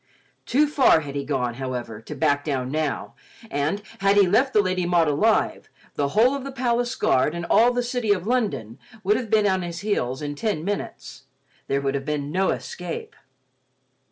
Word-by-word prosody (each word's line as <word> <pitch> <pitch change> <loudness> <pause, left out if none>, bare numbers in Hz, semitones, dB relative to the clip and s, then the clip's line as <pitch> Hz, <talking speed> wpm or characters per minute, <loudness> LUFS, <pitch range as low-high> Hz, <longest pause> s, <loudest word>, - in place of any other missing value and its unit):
Too 290 +5 +4
far 280 - +4
he 145 -2 -6
had 140 - -6
gone, 125 -4 -1
however, 120 -4 -4
to - - -8
back 145 -2 +1
down 130 -4 -2
now, 155 -1 -2 0.4
and, 150 +9 -1 0.2
had 195 +1 +3
he 200 - +7
left 225 +9 +3
the 215 - +3
Lady 185 -3 0
Maud 170 -2 +3
alive, 210 +10 +1 0.2
the 145 - 0
whole 245 +5 +5
of 280 -2 -4
the 275 - -6
palace 245 -2 0
guard 130 +5 +2
and 170 0 -4
all 240 +2 +6
the 245 0 -1
city 240 -3 -1
of 185 -3 +1
London 140 - -1 0.2
would 205 +3 +3
have 230 -1 -3
been 215 -1 +3
on 190 -2 +2
his 175 -1 -5
heels 140 - -1
in 145 0 -3
ten 170 0 -2
minutes; 135 -9 -5 0.4
there 140 0 0
would 135 -1 -1
have 135 -1 -3
been 145 -1 -2
no 190 +3 +1
escape. 180 -2 -5
175 Hz, 190 wpm, -24 LUFS, 140-220 Hz, 0.4 s, he